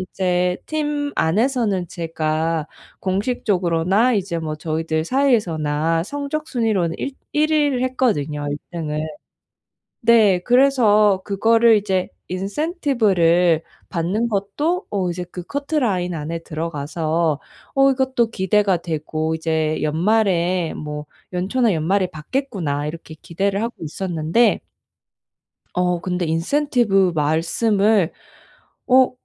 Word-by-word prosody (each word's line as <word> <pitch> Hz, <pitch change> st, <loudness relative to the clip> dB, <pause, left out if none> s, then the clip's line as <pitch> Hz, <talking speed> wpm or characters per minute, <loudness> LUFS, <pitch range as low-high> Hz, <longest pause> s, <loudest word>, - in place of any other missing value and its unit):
이제 180 Hz, -1 st, 0 dB
팀 295 Hz, -2 st, -2 dB
안에서는 210 Hz, +1 st, +1 dB
제가 160 Hz, -1 st, -2 dB, 0.3 s
공식적으로나 195 Hz, 0 st, +1 dB
이제 190 Hz, -4 st, -1 dB
뭐 155 Hz, -1 st, -4 dB
저희들 160 Hz, 0 st, -2 dB
사이에서나 165 Hz, -, +1 dB
성적 290 Hz, -, -4 dB
순위로는 210 Hz, -9 st, 0 dB
일 275 Hz, -, -3 dB, 0.2 s
1 305 Hz, +1 st, +2 dB
위를 290 Hz, -5 st, +2 dB
했거든요 155 Hz, -, 0 dB
1 145 Hz, -, -3 dB
등을. 155 Hz, -3 st, -3 dB, 1.1 s
네. 215 Hz, -6 st, +5 dB
그래서 215 Hz, -4 st, +4 dB
그거를 225 Hz, +2 st, +4 dB
이제 190 Hz, -3 st, -1 dB, 0.2 s
인센티브를 195 Hz, -, +1 dB, 0.3 s
받는 190 Hz, +7 st, -1 dB
것도 260 Hz, -, -1 dB
어 190 Hz, -3 st, -1 dB
이제 180 Hz, +1 st, -4 dB
그 180 Hz, -, -6 dB
커트라인 245 Hz, -, -1 dB
안에 160 Hz, +2 st, -4 dB
들어가서 160 Hz, 0 st, -2 dB, 0.4 s
어 270 Hz, 0 st, +5 dB
이것도 260 Hz, -3 st, +1 dB
기대가 195 Hz, 0 st, +2 dB
되고 160 Hz, -1 st, -3 dB
이제 160 Hz, -1 st, -1 dB
'연말에 180 Hz, 0 st, +1 dB
뭐 150 Hz, 0 st, -6 dB, 0.3 s
연초나 205 Hz, +5 st, +1 dB
연말에 180 Hz, +4 st, +1 dB
받겠구나.' 160 Hz, -, -3 dB
이렇게 160 Hz, 0 st, -8 dB
기대를 195 Hz, +4 st, -1 dB
하고 235 Hz, +1 st, -3 dB
있었는데 170 Hz, +6 st, +1 dB, 1.2 s
어 180 Hz, -1 st, +1 dB
근데 180 Hz, 0 st, -2 dB
인센티브 195 Hz, -, +2 dB
말씀을 175 Hz, +6 st, +2 dB, 0.7 s
어 260 Hz, 0 st, +5 dB
185 Hz, 250 characters per minute, -21 LUFS, 165-235 Hz, 1.2 s, 네